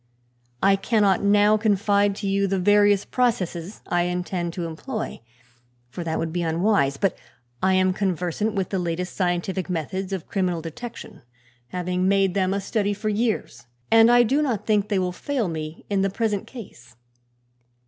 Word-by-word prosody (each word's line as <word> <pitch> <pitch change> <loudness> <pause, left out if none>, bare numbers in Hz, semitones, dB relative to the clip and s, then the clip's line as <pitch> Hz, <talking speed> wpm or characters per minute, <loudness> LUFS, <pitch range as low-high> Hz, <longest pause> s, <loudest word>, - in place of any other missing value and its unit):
I 195 0 +5
cannot 200 -2 +2
now 205 +1 +4
confide 205 -1 +2
to 200 0 -4
you 195 0 +1
the 195 0 0
various 205 +1 +4
processes 200 -7 -1
I 175 0 +1
intend 180 -1 -2
to 175 -2 -4
employ, 215 - -5 0.7
for 175 - -5
that 160 -1 -2
would 165 -1 -3
be 175 - -1
unwise; 165 -4 +1
but 195 +1 +1 0.5
I 190 0 +3
am 185 0 +3
conversant 190 +2 -1
with 190 -2 -1
the 190 - -1
latest 175 +1 -3
scientific 180 0 -1
methods 185 +3 -3
of 190 -4 -4
criminal 180 -4 -1
detection, 200 +1 -8 0.5
having 180 +4 -1
made 195 -1 +3
them 190 -1 +1
a 200 +1 -1
study 205 0 -1
for 215 +2 -3
years, 210 - -2 0.2
and 225 0 +7
I 245 0 +6
do 270 +6 +1
not 250 -9 -1
think 210 -2 +1
they 200 - +1
will 180 -1 0
fail 245 +4 -2
me 155 -1 -6
in 200 -2 0
the 195 - +1
present 205 0 -2
case. 125 - -12
195 Hz, 170 wpm, -24 LUFS, 175-205 Hz, 0.7 s, and